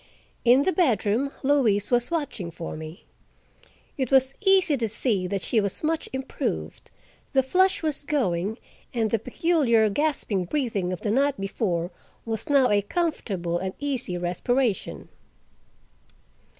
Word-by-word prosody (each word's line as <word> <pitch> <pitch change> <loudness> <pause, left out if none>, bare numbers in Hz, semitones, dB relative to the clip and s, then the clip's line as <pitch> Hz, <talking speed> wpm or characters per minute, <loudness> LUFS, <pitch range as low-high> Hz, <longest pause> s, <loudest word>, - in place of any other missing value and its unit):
In 250 +3 +5
the 375 - +2
bedroom 255 - +1
Louise 250 -8 +2
was 240 0 +2
watching 290 - -3
for 165 0 -7
me. 160 +4 -9 0.9
It 260 -3 0
was 265 0 +4
easy 385 -6 +4
to 230 -3 -1
see 205 -4 +1
that 195 0 -3
she 225 - +2
was 200 +6 -2
much 320 +1 -1
improved; 265 0 -4 0.4
the 265 -1 +4
flush 375 +7 +2
was 305 -2 -1
going, 220 - -1 0.4
and 225 -2 0
the 225 - +2
peculiar 240 - +2
gasping 245 -9 0
breathing 210 - -1
of 180 - -5
the 210 - -1
night 275 +2 +1
before 185 -3 -2 0.3
was 225 +6 -4
now 275 -4 +4
a 205 0 +4
comfortable 200 - -2
and 190 +1 -4
easy 260 -11 -2
respiration. 200 +6 -1
235 Hz, 135 wpm, -25 LUFS, 195-285 Hz, 0.9 s, In